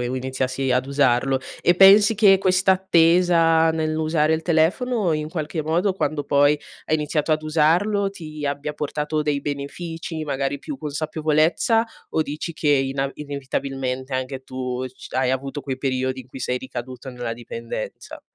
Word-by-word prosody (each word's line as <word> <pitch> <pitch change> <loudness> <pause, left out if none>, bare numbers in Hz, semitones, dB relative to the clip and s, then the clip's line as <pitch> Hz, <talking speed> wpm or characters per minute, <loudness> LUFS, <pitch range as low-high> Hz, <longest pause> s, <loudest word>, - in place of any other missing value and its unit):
iniziassi 130 +1 -2
ad 125 +1 +1
usarlo. 135 -1 +2 0.2
E 175 - +4
pensi 205 +3 +7
che 195 -2 +6
questa 185 0 +3
attesa 170 -2 +4
nell'usare 155 0 +1
il 160 - -3
telefono 180 +5 +1
in 155 0 -2
qualche 155 0 -3
modo 170 +6 +1
quando 150 -5 -2
poi 145 +1 +3 0.3
hai 155 - +2
iniziato 150 0 -1
ad 155 0 +2
usarlo, 175 +7 +2
ti 155 -5 -8
abbia 145 +1 -2
portato 150 +1 -2
dei 150 -1 0
benefici? 160 +3 -5
Magari 140 -1 -2
più 290 - -7
consapevolezza? 155 - +1 0.2
O 160 - +1
dici 155 +3 -5
che 155 -1 -2
ina 135 -1 +1
inevitabilmente 135 -2 -4
anche 130 +1 -3
tu 130 -1 -4
c 130 - -13
hai 130 -1 +2
avuto 135 +2 -3
quei 135 -2 -5
periodi 130 -1 -1
in 125 - -14
cui 130 +1 -10
sei 125 0 -1
ricaduto 130 0 -7
nella 125 -2 -4
dipendenza? 115 -1 -7
150 Hz, 150 wpm, -22 LUFS, 130-165 Hz, 0.3 s, pensi